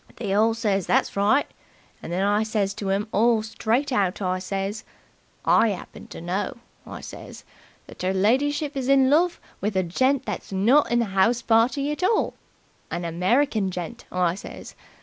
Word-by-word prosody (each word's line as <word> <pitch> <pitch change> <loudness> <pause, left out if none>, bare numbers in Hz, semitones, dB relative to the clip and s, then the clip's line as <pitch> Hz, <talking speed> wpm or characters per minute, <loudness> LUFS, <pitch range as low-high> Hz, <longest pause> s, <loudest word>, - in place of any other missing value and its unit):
They 205 -5 -3
all 220 +2 +3
says 200 -5 0
that's - - +1
right, 210 +9 +3 0.6
and - - -7
then 185 +2 0
I 205 +1 +2
says 215 -3 -1
to 200 -1 -4
'em 200 +3 0
all 225 +1 +3
straight 235 +5 -1
out, 200 -5 +1
I 185 -2 -1
says, 195 +2 -4 0.6
'I 225 - +4
'appen 180 - -10
to - - -9
know', 185 +6 -3 0.3
I - - -8
says, - - -10 0.4
'that - - -10
'er 185 - +2
lidyship 280 +9 +1
is 265 -2 -2
in 270 -1 +5
love 340 +4 +3 0.2
with 205 0 -2
a 190 - +2
gent 260 +10 +1
that's 205 -2 -5
not 230 +7 +3
in 240 - +3
the 230 +2 +2
party 250 +6 +3
at 300 - -5
all. 415 +5 +1 0.6
An 175 - -4
American 195 - +1
gent,' 175 -2 -6
I 180 -2 +1
says. 195 - -9
215 Hz, 170 wpm, -24 LUFS, 190-250 Hz, 0.6 s, in